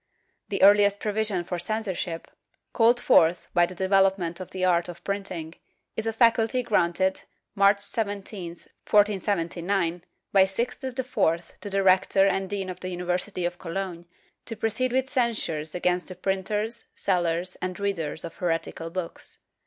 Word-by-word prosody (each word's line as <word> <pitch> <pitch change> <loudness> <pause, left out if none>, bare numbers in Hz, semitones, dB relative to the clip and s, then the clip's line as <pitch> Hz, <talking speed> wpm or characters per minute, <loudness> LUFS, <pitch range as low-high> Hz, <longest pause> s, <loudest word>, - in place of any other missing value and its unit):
The 195 - 0
earhest 205 0 +6
provision 210 -3 -1
for 175 0 -4
censorship, 185 -4 -3 0.5
called 235 +1 +4
forth 170 -4 +4
by 175 -1 +4
the 185 - -9
development 190 -2 +2
of 185 - -7
the 185 -1 -1
art 175 -1 +2
of 175 - -10
printing, 185 -5 -4 0.4
is 220 - -3
a - - +2
faculty 230 +2 +3
granted, 190 -3 +1 0.3
March 200 0 +4
17, 200 -4 -3 0.4
1479, 190 -3 +1 0.3
by 195 -1 +6
Sixtus 240 +6 -3
IV 175 -10 0
to 205 - -5
the 195 0 +1
rector 190 +1 +4
and 195 -1 0
dean 195 -2 -3
of 180 - -10
the 185 - -5
Uni 180 0 -5
versity 180 +1 -2
of 175 0 -3
Cologne, 175 -1 -5 0.4
to 225 - -5
proceed 230 +4 0
with 260 +1 +1
censures 220 - -1
against 180 0 0
the 185 - -6
printers, 205 +5 -1
sellers 175 -1 0
and 185 0 -4
readers 170 -6 -2
of 165 - -9
heretical 165 -1 -2
books. 175 0 -5
190 Hz, 150 wpm, -26 LUFS, 175-205 Hz, 0.5 s, earhest